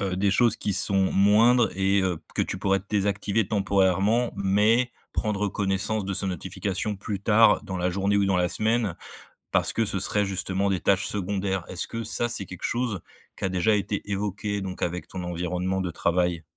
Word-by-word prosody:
heu, 95 -2 -2
des 100 +1 +1
choses 115 +2 +3
qui 105 - -2
sont 95 0 +3
moindres 110 +4 +4
et 95 +1 +2
heu, 90 -3 -1 0.2
que - - +1
tu 95 - -4
pourrais 95 -1 +1
désactiver 100 0 0
temporairement 100 +3 +1
mais 105 +5 +2 0.2
prendre 105 -1 -1
connaissance 100 +2 -1
de 95 0 -3
ces 95 - +2
notifications 95 +2 -3
plus 100 0 -5
tard, 110 +2 +4
dans 95 - -5
la 90 0 0
journée 100 +2 0
ou 100 - +2
dans 95 -1 +1
la 90 0 +1
semaine 110 -1 0 0.6
parce - - +4
que 115 - 0
ce 100 -2 +1
serait 105 +2 +3
justement 95 0 -1
des 95 - 0
tâches 95 0 +2
secondaires? 95 -1 -2
Est-ce 90 - -3
que 115 0 -5
ça, 115 +2 -1
c'est 115 -4 -2
quelque 90 - -10
chose 120 -6 -1 0.4
qui - - -3
a 95 - 0
déjà 95 +4 +2
été 100 0 -2
évoqué 100 0 -3
donc 95 -1 -6
avec 90 +1 -3
ton 95 - -6
environnement 90 +2 -2
de 90 - -2
travail? 85 0 0
100 Hz, 190 wpm, -25 LUFS, 95-105 Hz, 0.6 s, moindres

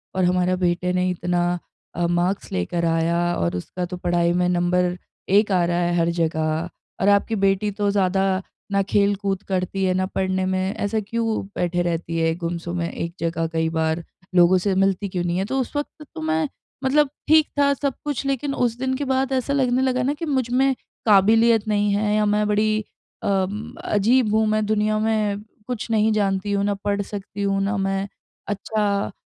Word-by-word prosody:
और 185 - +1
हमारा 180 0 +2
बेटे 180 0 0
ने 180 0 +1
इतना 175 0 0 0.4
अ, 175 0 0
मार्क्स 175 +3 -1
लेकर 170 - -1
आया 165 +1 +1 0.2
और 85 +1 -1
उसका 180 - -4
तो 180 +1 -6
पढ़ाई 175 -1 +1
में 180 0 +2
नंबर 180 0 +1 0.3
1 205 +1 +4
आ 180 -2 +3
रहा 175 0 0
है 175 0 +1
हर 170 0 +2
जगह 160 +1 0 0.3
और 200 - +4
आपकी 205 +2 +3
बेटी 195 +1 +1
तो 205 0 -1
ज़्यादा 190 -1 +1 0.5
ना 200 0 +3
खेल-कूद 200 -1 +1
करती 190 +1 -1
है 185 -1 +2
ना 185 0 +1
पढ़ने 190 0 -1
में 185 +1 0
ऐसा 210 +2 -1
क्यों 225 -3 -1
बैठे 175 0 0
रहती 165 -1 -2
है 165 0 +2
गुमसुम 170 0 -4
अ, - - -1
में 170 - -2
एक 170 0 -4
जगह 165 0 -1
कई 160 0 +1
बार 160 +1 -1 0.3
लोगों 175 +1 +6
से 200 -2 +1
मिलती 195 +1 +1
क्यों 180 -1 -2
नहीं 175 +1 -1
है।" 190 - 0
तो 265 +4 -1
उस 260 - -3
वक़्त 295 +1 -4
तो 160 - -5
मैं 155 0 0 0.4
मतलब 285 +1 +3 0.2
ठीक 315 0 +5
था 280 0 +4
सब 280 -1 -2
कुछ 285 -2 -2
लेकिन 275 +1 -1
उस 240 -1 0
दिन 260 0 0
के 285 - -2
बाद 265 0 0
ऐसा 260 +2 0
लगने 260 -2 +2
लगा 255 -1 +1
ना 275 +3 +1
कि 315 +3 -5
मुझमें 265 -1 +1 0.3
काबिलियत 220 +2 +5
नहीं 205 -1 +2
है 210 +1 +1
या 215 - +2
मैं 210 0 +2
बड़ी 215 +1 +1 0.4
अम 195 +2 -1
अजीब 215 +2 +2
हूँ 220 0 +3
मैं 215 0 +1
दुनिया 215 0 +1
में 215 -2 0 0.3
कुछ 235 -2 -4
नहीं 220 0 +3
जानती 200 -1 0
हूँ 200 0 +1
ना 205 - +1
पढ़ 200 0 +1
सकती 200 0 -7
हूँ 195 0 +1
ना 200 +2 0
मैं 195 0 -1 0.4
अच्छा 210 +1 -1 0.2
अ, - - -8
195 Hz, 195 wpm, -22 LUFS, 175-215 Hz, 0.5 s, लोगों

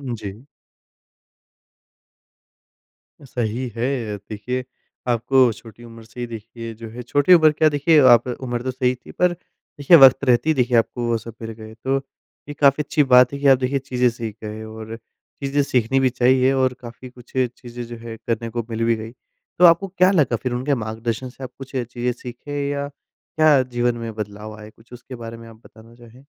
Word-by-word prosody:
जी। 105 +4 -9 2.8
सही 125 -1 -3
है 120 -3 -2
अ, - - -7
देखिए 125 +4 -4 0.4
आपको 125 +1 +3
छोटी 115 +1 -14
उम्र 115 -1 -12
से 115 +2 -14
ही 120 - -2
देखिए 115 0 -8
जो 115 0 -10
है 120 +2 -8
छोटी 145 +8 +3
उम्र 155 -3 +6
क्या 155 +1 +3
देखिए 150 +2 +3
आप 120 +1 +6
उम्र 120 -1 -4
तो 130 - -2
सही 125 -1 0
थी 125 - -15
पर 180 0 +2
देखिए 165 -2 +1
वक़्त 135 -1 +7
रहते 125 +5 +3
ही - - +4
देखिए 125 -3 +2
आपको 120 +1 0
वो 115 -1 +1
सब 115 0 -10
मिल 115 0 -5
गए 110 0 -11
तो 135 +1 +1 0.5
ये - - -4
काफ़ी 145 +1 +3
अच्छी 150 +1 +1
बात 125 +1 +7
है 140 - -5
कि 145 - +1
आप 135 -1 +7
देखिए 130 +2 -1
चीज़ें 125 -2 +1
सीख 115 -3 -6
गए। 110 +1 -6
और 110 0 -8
चीज़ें 140 +4 -5
सीखनी 130 0 +1
भी 130 -1 +3
चाहिए 130 +1 +3
और 130 -1 +1
काफ़ी 120 +2 -10
कुछ 125 -1 -18
चीज़ें 120 -1 -3
जो 120 0 -8
है 115 0 -8
करने 115 0 -3
को 120 0 -3
मिल 115 0 -2
भी 115 0 +2
गई। 110 +1 -8 0.5
तो 180 - +7
आपको 170 +3 +5
क्या 185 +1 +3
लगा 145 -10 +2
फिर 125 - -1
उनके 130 +4 0
मार्गदर्शन 115 +3 -4
से 130 +1 -12
आप 130 - -7
कुछ 135 -1 -10
चीज़ें 125 0 -2
सीखे? 140 +4 -6
या 140 0 -2
क्या 150 0 +1
जीवन 120 -1 -1
में 115 -1 -6
बदलाव 105 0 -7
आए 105 - -11
कुछ 115 +2 -20
उसके 125 +1 -10
बारे 115 -1 -8
में 115 - -12
आप 115 - -14
बताना 115 +1 -17
चाहें? 120 +3 -17
125 Hz, 195 wpm, -21 LUFS, 115-135 Hz, 2.8 s, वक़्त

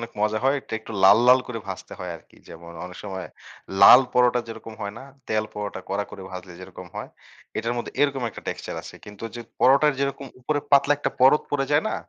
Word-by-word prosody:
অনেক 115 0 -6
মজা 105 +1 +1
হয়। 135 +1 +4
এটা - - -15
একটু 110 - -10
লাল, 95 - +8
লাল 130 +1 +7
করে 125 -2 -5
ভাজতে 95 - -7
হয় 90 -1 -5
আরকি। - - -22
যেমন 85 +1 -11
অনেক 90 0 -10
সময় 95 -3 -5 0.5
লাল 120 +6 +10
পরোটা 125 0 +3
যেরকম 115 0 -9
হয় 100 0 -4
না? - - -10 0.2
তেল 110 0 +1
পরোটা 105 -2 -5
কড়া 100 +1 -1
করে 95 - -9
ভাজলে 90 -1 -8
যেরকম 95 - -10
হয়? - - -5 0.5
এটার 115 - -1
মধ্যে 120 - -5
এরকম 140 -2 +1
একটা - - -10
টেক্সচার - - -5
আছে। - - -11
কিন্তু 105 +2 -10
যে, 120 - -6 0.2
পরোটার 140 +3 +5
যেরকম 140 0 -2
উপরে 145 +3 -1
পাতলা 140 +1 +5
একটা - - -1
পরত 135 +4 +6
পড়ে 140 -1 0
যায় 145 +2 +4
না? - - -2
115 Hz, 215 wpm, -24 LUFS, 100-135 Hz, 0.5 s, লাল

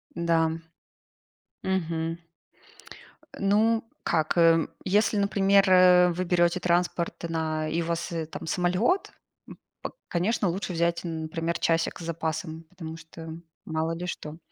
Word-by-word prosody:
Да. 165 -1 +2 1.1
Мгм. 165 -3 -1 1.2
Э, - - -12
ну 220 +3 +3 0.2
как, 160 +1 0
эм, 165 -1 +5
если, 210 +3 +2
например, 200 -1 +3
э, 180 -1 +7
вы 180 +2 -2
берёте 175 0 +2
транспорт 175 -1 0
на 155 -1 -1
и 165 +2 0
у - - -3
вас, 170 +1 -2 0.2
там, - - -7
самолет, 200 - +1 0.4
м - - -11 0.2
п - - -4 0.2
конечно, 190 +2 0
лучше 185 +1 -3
взять, 170 0 +1
например, 165 0 -3
часик 165 +1 0
с 165 - -7
запасом, 160 0 -4
потому 165 -3 -8
что, 165 0 -10 0.3
мало 160 +1 -1
ли 175 +2 -5
что. 155 -2 -6
170 Hz, 130 wpm, -27 LUFS, 165-185 Hz, 1.2 s, э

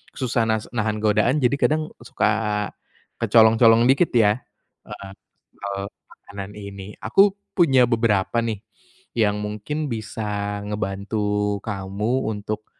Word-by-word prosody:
susah 120 -3 0
nas 110 -1 -1
nahan 110 -2 -1
godaan, 110 +7 +2
jadi 125 +3 +3
kadang 155 +2 +1 0.2
suka 105 -2 0 0.5
kecolong-colong 115 +1 +5
dikit 140 +6 +3
ya 110 0 +4 0.5
heeh, 100 -2 -9 0.4
soal, 100 0 -5 0.2
makanan 100 0 -10
ini. 100 0 -9
Aku 195 0 +3 0.2
punya 135 -9 +5
beberapa 115 -2 +1
nih, 110 -3 -3 0.5
yang 105 -2 +2
mungkin 110 +9 -4
bisa 105 -2 -4
ngebantu 105 0 -2
kamu 105 +5 -2
untuk, 105 +1 -5
105 Hz, 115 wpm, -23 LUFS, 105-115 Hz, 0.5 s, kecolong-colong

